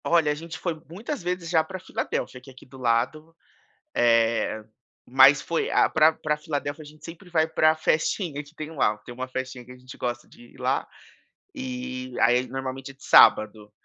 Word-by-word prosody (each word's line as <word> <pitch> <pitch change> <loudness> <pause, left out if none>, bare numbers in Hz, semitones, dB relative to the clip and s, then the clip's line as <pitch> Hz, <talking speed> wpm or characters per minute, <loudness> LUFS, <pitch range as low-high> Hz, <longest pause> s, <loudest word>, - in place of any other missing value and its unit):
Olha, 165 -3 +3
a - - -1
gente 165 +2 -8
foi 165 -3 -4
muitas 215 - -5
vezes 180 -1 -3
já 160 -2 +3
pra 185 +4 -8
Filadélfia, 130 -7 -4
que 130 - -15
é - - -13
aqui 130 - -16
do 130 0 -14
lado, 130 +7 -1 0.6
eh, 115 -2 +2 0.4
mas 135 +3 +6
foi 170 - -2
a - - +4
pra 160 0 +4
pra 150 -1 -2
Filadélfia, 150 -1 -4
a - - -12
gente 150 +1 -16
sempre 170 +2 -11
vai 160 -2 +2
pra 155 -1 +3
festinha 155 0 0
que 150 +2 -19
tem 155 0 -7
lá. 105 -7 +1
Tem 120 - -9
uma 130 +1 -5
festinha 130 -1 -5
que 125 - -11
a - - -13
gente 130 +1 -13
gosta 120 -1 -4
de 240 +1 -17
ir - - -18
lá, - - 0 0.7
e 255 -1 -6
aí 125 +2 +3
normalmente, 135 0 -5
é - - -17
de 135 - -20
sábado, 105 -1 +5
150 Hz, 200 wpm, -25 LUFS, 130-165 Hz, 0.7 s, mas